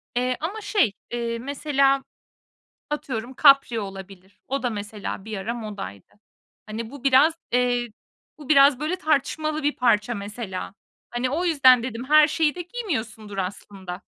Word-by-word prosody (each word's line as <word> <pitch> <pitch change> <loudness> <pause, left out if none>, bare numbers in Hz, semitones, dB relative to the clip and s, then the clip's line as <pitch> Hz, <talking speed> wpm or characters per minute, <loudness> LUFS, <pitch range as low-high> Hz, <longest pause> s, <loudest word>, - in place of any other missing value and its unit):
Eee, 250 0 0
ama 390 +8 -4
şey, 400 - +2 0.2
eee, 235 -1 -2
mesela, 275 +1 +1 0.9
atıyorum 260 -5 -4
kapri 275 -4 +5
olabilir. 195 -1 -9
O 275 0 -2
da 245 - +1
mesela 205 -2 -6
bir 220 -2 -5
ara 215 +5 -3
modaydı. 205 - -8 0.5
Hani, 220 +1 -6
bu 280 0 -11
biraz, 275 +4 +5 0.2
eee, 245 -1 +1 0.5
bu 300 -1 -12
biraz, 275 -2 +6
böyle, 310 +4 -1
tartışmalı 310 -1 -1
bir 295 +1 +1
parça, 240 -2 +2
mesela. 200 -2 -6 0.4
Hani, 245 +1 -1
o 330 +6 -1
yüzden 260 -7 +5
dedim 235 0 -5
her 305 0 +7
şeyi 310 0 +1
de 355 - -4
giymiyorsundur, 230 - -5
aslında. 190 -1 -6
245 Hz, 145 wpm, -24 LUFS, 215-290 Hz, 0.9 s, her